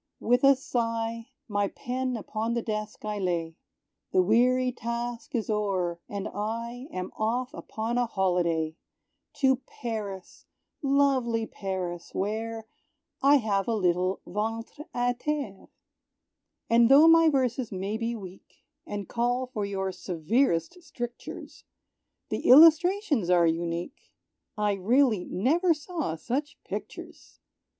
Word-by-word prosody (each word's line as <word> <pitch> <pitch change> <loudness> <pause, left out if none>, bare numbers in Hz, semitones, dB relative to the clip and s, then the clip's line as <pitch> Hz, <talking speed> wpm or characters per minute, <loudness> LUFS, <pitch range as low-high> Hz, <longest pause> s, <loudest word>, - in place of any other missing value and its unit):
With 245 +3 +2
a 275 0 +7
sigh, 230 -3 -2 0.2
My 205 -2 0
pen 255 +3 -3
upon 225 +2 -3
the 235 - -1
desk 215 -1 -4
I 210 -1 -3
lay; 170 -3 -1 0.6
The 185 - +5
weary 250 +5 +3
task 235 +1 -5
is 225 - -1
o'er, 195 -5 -1
and 200 0 -4
I 230 +5 -4
Am 185 -6 -5
off 245 +5 -1
upon 230 -3 -3
a 245 - +1
holiday, 170 -5 0 0.6
To 265 -1 +4
Paris, 215 -7 -7 0.3
lovely 270 -5 +2
Paris, 185 -5 -5
where 220 +2 -3 0.6
I 280 +2 +6
have 205 -7 +1
a 230 - +1
little 185 -1 +1
ventr' 225 - -4
à 245 0 0
terre.[B] 285 -10 -3 1.0
And 235 0 +5
tho' 290 +4 +8
my 330 0 +7
verses 255 -4 0
may 195 +2 -3
be 230 +1 -2
weak, 190 -3 -12 0.2
And 205 -2 -5
call 245 +2 0
for 220 -6 -4
your 190 -1 -2
severest 185 - 0
strictures, 240 -7 -8 0.7
The - - -2
illustrations 320 - +6
are 175 -1 +5
unique, 170 +6 -3 0.5
I 210 -1 +1
really 220 +1 +2
never 325 - +2
saw 300 - -4
such 280 - -3
pictures! - - -8
225 Hz, 125 wpm, -27 LUFS, 195-255 Hz, 1.0 s, tho